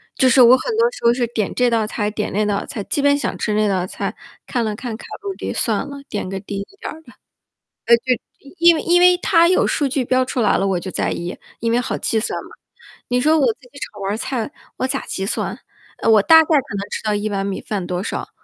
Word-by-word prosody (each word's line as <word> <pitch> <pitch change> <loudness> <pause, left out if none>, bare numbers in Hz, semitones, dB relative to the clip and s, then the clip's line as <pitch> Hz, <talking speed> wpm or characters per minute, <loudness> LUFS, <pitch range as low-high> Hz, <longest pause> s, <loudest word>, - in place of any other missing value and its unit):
就 260 - +4
是 255 +1 +6
我 245 +2 +8
很 455 - -3
多 470 +1 +4
时 - - -10
候 235 - +5
是 245 -1 0
点 225 -3 -2
这 250 -1 +2
道 225 -2 +1
菜， 210 -1 -2
点 210 0 -3
那 210 +2 0
道 205 -1 -1
菜， 215 - -6
基 285 - -2
本 285 0 +4
想 290 - -3
吃 215 - -1
那 215 0 +2
道 185 -3 0
菜， - - -4 0.3
看 240 -3 -1
了 215 - -1
看 230 +1 -5
卡 220 - -11 0.2
路 400 -1 -4
里， - - -5
算 - - 0
了， 280 - -8
点 205 -3 -4
个 195 0 -4
低 200 0 -6
一 200 - -9
点 - - -5
儿 320 - -13
的。 - - -17 0.7
呃， 235 - +7
就 235 - -17 0.6
因 340 0 +7
为 315 - -2
因 350 +1 +3
为 360 0 +6
它 340 -1 +4
有 370 - +3
数 290 - +1
据 270 0 -1
标 255 +1 +2
出 255 - -3
来 210 - +3
了， - - 0
我 190 -2 0
就 185 - -6
在 - - -1
意， 175 +1 -4 0.2
因 230 0 0
为 235 - +3
好 245 - -2
计 220 - 0
算 215 - -3
嘛。 - - -14 0.6
你 250 0 +1
说 310 +3 +4
我 275 - +3
自 - - -41
己 280 - -14
炒 205 -5 -7
盘 195 - -2
儿 210 - -2
菜， 260 0 -3 0.3
我 260 - -1
咋 270 +1 -3
计 190 - -4
算？ - - -3 0.4
呃， - - +1
我 215 -2 +6
大 320 +6 +8
概 - - -8
可 285 -9 +1
能 - - -2
知 - - -3
道 215 -1 0
1 205 +1 -2
碗 195 -1 -2
米 195 -1 -3
饭 200 -4 -4
多 180 0 -2
少， - - -4
235 Hz, 285 characters per minute, -20 LUFS, 205-285 Hz, 0.7 s, 我